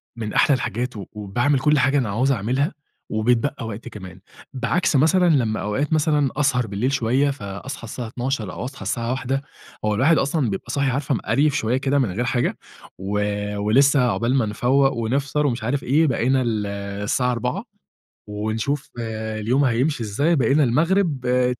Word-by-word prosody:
من 110 -2 -5
أحلى 145 - +4
الحاجات 125 0 -3 0.2
وباعمل 120 +7 0
كل 150 +2 +3
حاجة 135 +2 +3
أنا 125 -6 0
هاعوز 125 +7 +1
أعملها، 130 - 0 0.4
وبيتبقى 115 +2 0
وقت 110 +1 -7
كمان. 95 -2 -9 0.3
بعكس 135 +7 0
مثلًا 175 +6 +4
لمّا 120 -8 +1
أوقات 135 +10 -1
مثلًا 150 -3 +2
أسهر 130 -5 +1
بالليل 105 +7 -1
شوية، 130 +3 +2
فأصحى 115 +1 -7
الساعة 120 +2 -6
12:00 120 -2 -3
أو - - -5
أصحى 135 +2 -8
الساعة 115 0 -2
13:00 135 +1 -1 0.4
هو 105 -1 +1
الواحد 155 +8 +4
أصلًا 140 -3 +1
بيبقى 100 +4 -4
صاحي 140 0 +1
عارفة 135 +1 -1
مقريف 145 +5 +1
شوية 125 -2 0
كده 140 +1 +1
من 120 -8 +1
غير 115 +7 -2
حاجة، 120 +1 0 0.4
و 100 +2 -2 0.4
ولسه 135 +7 +4
عقبال 120 +4 0
ما 125 -5 +2
نفوّق 135 +6 +2
ونفطر 135 +5 -1
ومش 120 -4 -2
عارف 135 +4 -1
إيه، 155 +5 +3
بقينا 130 +1 +1
ال 110 -4 -1 0.4
الساعة 125 +4 +1
16:00 125 - -2 0.6
ونشوف 110 +7 -2
اليوم 110 +3 -1
هيمشي 125 +2 +1
إزاي، 140 +11 +1
بقينا 140 +1 +3
المغرب، 155 +2 +1
آآ، 125 0 +2
125 Hz, 165 wpm, -22 LUFS, 110-140 Hz, 0.6 s, أحلى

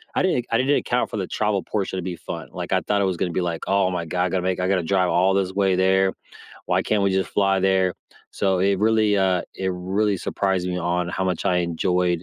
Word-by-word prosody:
I - - +2
didn't 175 -10 +1
I 115 - +3
didn't 135 +4 +2
account 125 - -1
for - - -4
the 95 -3 -3
travel 105 -2 0
portion 95 +1 -3
to 90 - -3
be 90 0 -4
fun. - - -7
Like - - -6
I - - +2
thought 100 -1 0
it - - +2
was 95 -2 -1
gonna 90 - -1
be 90 - -1
like, 85 -2 -3
"Oh 95 -1 +2
my 90 -2 -2
God, 90 +2 -1
I - - -1
gotta 95 +1 -1
make 95 0 -1
I 90 - 0
gotta 95 -1 +2
drive 90 +1 +1
all 95 +3 +3
this 95 -1 0
way 95 -1 +2
there. 95 +1 +3 0.5
Why - - +1
can't 105 -2 0
we 100 - +2
just 95 0 0
fly 100 -1 +2
there?" 95 -1 +2 0.4
So 95 -2 0
it 100 0 +2
really, 110 0 +3
uh, 95 -2 +2
it 95 0 -1
really 95 +3 0
surprised 95 0 -1
me 90 - -2
on 90 0 -1
how 95 +2 -2
much 90 -3 -2
I 90 - +2
enjoyed 90 0 0
95 Hz, 255 wpm, -23 LUFS, 90-100 Hz, 0.5 s, I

